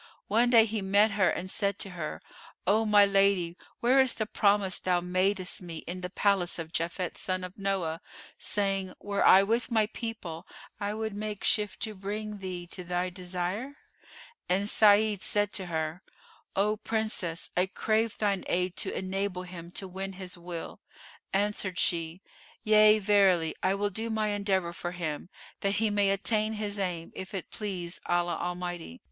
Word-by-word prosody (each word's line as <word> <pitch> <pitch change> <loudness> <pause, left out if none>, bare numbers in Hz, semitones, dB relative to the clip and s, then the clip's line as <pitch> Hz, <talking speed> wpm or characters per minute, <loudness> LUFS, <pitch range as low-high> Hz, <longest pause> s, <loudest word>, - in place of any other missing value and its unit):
One 235 +4 +4
day, 230 -2 +7
he 220 -1 -2
met 200 +3 +4
her 200 -2 +3
and 185 +1 -3
said 200 -1 0
to 195 - -4
her, 170 -4 -5 0.4
"O 215 +4 +3
my 205 -1 +7
lady, 195 -3 +2 0.3
where 255 +3 +5
is 260 -2 +3
the 220 - -1
promise 200 -3 +2
thou 180 -1 +1
madest 185 +2 0
me, 170 -3 -7
in 180 +2 -5
the 180 - -4
palace 195 -2 +1
of 165 -1 -6
Japhet 170 +2 -2
son 185 -1 -1
of 180 0 -7
Noah, 190 -5 -1 0.4
saying, 195 -2 -1
'Were 200 -1 -1
I 190 +1 +8
with 230 +5 0
my 220 -3 +3
people, 210 -7 -6 0.3
I 205 0 -2
would 220 -1 -3
make 210 0 -5
shift 210 -4 0
to 220 - -2
bring 210 +1 -5
thee 180 -2 -5
to 180 - -5
thy 180 +1 -1
desire?'" 185 +9 -4 0.7
And 195 +3 +2
Sa'id 210 -1 +5
said 205 0 +1
to 190 -2 -3
her, 160 +1 -2 0.5
"O 210 +2 +2
Princess, 215 -6 -2
I 180 +1 +2
crave 220 +3 0
thine 200 -3 0
aid 180 +1 0
to - - -1
enable 190 -1 -2
him 175 -2 -9
to 195 - -4
win 190 +1 -5
his 185 -1 -5
will." 175 -1 -7 0.5
Answered 200 -2 0
she, 170 +1 0 0.4
"Yea, 215 -1 +7
verily; 195 -5 +3
I 190 +1 +2
will 205 +1 -1
do 225 +4 -3
my 215 -1 0
endeavour 195 -4 0
for 175 +1 -5
him, 170 -1 -4 0.3
that 200 0 0
he 220 0 +1
may 205 -1 +3
attain 215 +2 +1
his 210 -1 -3
aim, 175 -4 -2
if 190 +1 -7
it 185 - -6
please 185 -5 -4
Allah 175 0 +1
Almighty." 175 - -4
195 Hz, 170 wpm, -29 LUFS, 180-210 Hz, 0.7 s, I